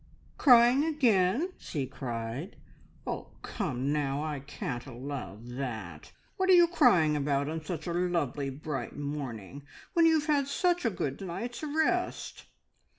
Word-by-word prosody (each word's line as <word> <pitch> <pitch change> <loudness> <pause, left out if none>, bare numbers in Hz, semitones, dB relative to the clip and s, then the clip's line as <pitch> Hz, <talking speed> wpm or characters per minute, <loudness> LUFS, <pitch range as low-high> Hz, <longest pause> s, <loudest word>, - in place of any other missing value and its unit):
"Crying 245 +1 +7
again?" 265 - +2
she 140 -5 -3
cried. 125 - -5 0.5
"Oh, - - -5
come 140 - -2
now, 145 -1 -1
I 150 -2 -3
can't 135 -2 -5
allow 125 -6 -6
that! 115 - -6 0.3
What 375 0 +1
are - - +8
you 345 -1 +7
crying 235 - +4
about 140 -1 0
on 160 +1 -4
such 160 -2 -5
a 170 - -2
lovely, 170 -6 0
bright 135 -2 -5
morning, 140 -4 -5 0.3
when 335 -1 +5
you 325 - +5
have 305 -1 +1
had 290 -3 +2
such 350 +2 +1
a - - +4
good 145 -7 -3
night's 195 +7 -5
rest?" 315 +4 -1
155 Hz, 145 wpm, -30 LUFS, -, 0.5 s, are